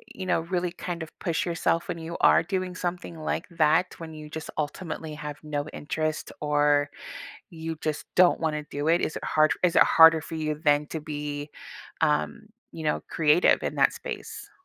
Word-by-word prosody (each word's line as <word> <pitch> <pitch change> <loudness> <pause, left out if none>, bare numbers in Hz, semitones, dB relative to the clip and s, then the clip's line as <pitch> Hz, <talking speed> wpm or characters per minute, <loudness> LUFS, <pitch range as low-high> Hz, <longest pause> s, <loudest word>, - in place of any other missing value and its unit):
you 185 - -5
know, 180 -2 +1
really 175 +1 -2
kind 175 -1 -5
of 160 - -13
push 170 +3 -1
yourself 170 -1 0
when - - -3
you 165 +1 -6
are - - +6
doing 185 +1 -3
something 175 -2 -4
like 155 - -2
that 165 +1 +2
when 165 -1 -8
you 155 -1 -9
just 160 0 -7
ultimately 155 0 -4
have 150 -1 -6
no 150 -1 -3
interest 155 +1 -3
or 145 -1 +2 0.6
you 165 -2 -5
just 155 -2 -2
don't 180 -1 +5
wanna 155 -2 -1
do 145 +1 -3
it, 170 +2 +4
is - - -2
it - - -9
hard 155 0 +3
is 180 -1 +3
it - - +8
harder 160 0 +7
for 160 - -7
you 155 -1 -1
then 145 -1 +3
to 160 - -4
be, 145 -1 -5 0.5
um, 150 +4 +1 0.3
you 160 - -8
know, 150 - 0
creative 155 +2 +4
in - - -2
that - - +4
space? - - -7
160 Hz, 190 wpm, -26 LUFS, 150-170 Hz, 0.6 s, it